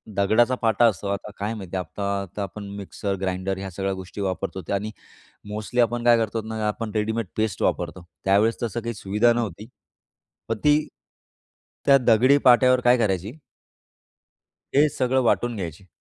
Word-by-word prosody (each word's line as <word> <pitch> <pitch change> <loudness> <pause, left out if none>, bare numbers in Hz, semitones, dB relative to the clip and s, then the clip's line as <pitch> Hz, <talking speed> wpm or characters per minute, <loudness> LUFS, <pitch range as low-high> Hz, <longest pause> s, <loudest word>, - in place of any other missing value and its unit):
दगडाचा 110 +6 +3
पाटा 115 +1 +3
असतो 100 -2 -2
आता 100 +1 -4
काय 105 +3 -2
माहिती 95 -5 -7
आहे 90 - -3
आता 100 +3 -3
आता 100 +1 -5
आपण 100 +2 -7
मिक्सर, 100 0 -4
ग्राइंडर 95 0 -2
ह्या 95 0 -5
सगळ्या 95 +2 -2
गोष्टी 95 +2 -7
वापरतो 95 0 -3
ते - - -2
आणि 105 +2 -2 0.6
मोस्टली 110 +4 -1
आपण 120 0 0
काय 120 -1 +6
करतो 115 0 -1
ना 110 -1 -2
आपण 110 +1 -3
रेडीमेड 110 0 -1
पेस्ट 110 -3 -1
वापरतो 85 0 -2 0.2
त्यावेळेस 100 +4 +3
तसं 120 0 -2
काही 115 +1 -4
सुविधा 105 +4 +2
नव्हती 110 -3 -4 0.8
पण 115 - -1
ती 150 +1 +3 1.0
त्या 140 -1 +7
दगडी 125 +2 +4
पाट्यावर 125 0 +6
काय 125 0 +5
करायची 105 - -1 1.4
हे 145 +2 +6
सगळं 130 -1 +1
वाटून 120 0 +1
घ्यायची 90 -1 -6
105 Hz, 160 wpm, -24 LUFS, 95-120 Hz, 1.4 s, त्या